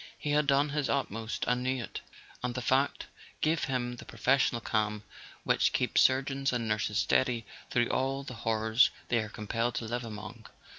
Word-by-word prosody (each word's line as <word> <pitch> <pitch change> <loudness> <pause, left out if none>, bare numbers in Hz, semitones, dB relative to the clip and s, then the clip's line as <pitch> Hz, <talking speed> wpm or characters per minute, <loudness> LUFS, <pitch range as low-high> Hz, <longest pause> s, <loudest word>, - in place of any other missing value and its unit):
He 150 - -3
had 150 0 +2
done 140 +1 +3
his 145 -1 -1
utmost, 115 -4 -2
and 125 0 +1
knew 130 -1 -1
it; - - -7 0.4
and 125 -1 -2
the 125 - -2
fact 135 +3 +1 0.4
gave 160 +1 +2
him 125 -2 -2
the - - -9
pro¬ 115 - -12
fessional 130 -2 +2
calm 105 -1 0 0.4
which - - +2
keeps - - +2
surgeons 135 +1 +2
and 120 -2 -1
nurses 105 -1 0
steady 120 -3 +2 0.2
through 120 -1 +2
all 135 +1 0
the 130 - -7
horrors 110 +1 +3 0.2
they 120 - +3
are 110 -1 -3
compelled 115 +3 -2
to 115 - -2
live 120 +2 -3
among. 110 0 -8
120 Hz, 185 wpm, -30 LUFS, 110-135 Hz, 0.4 s, done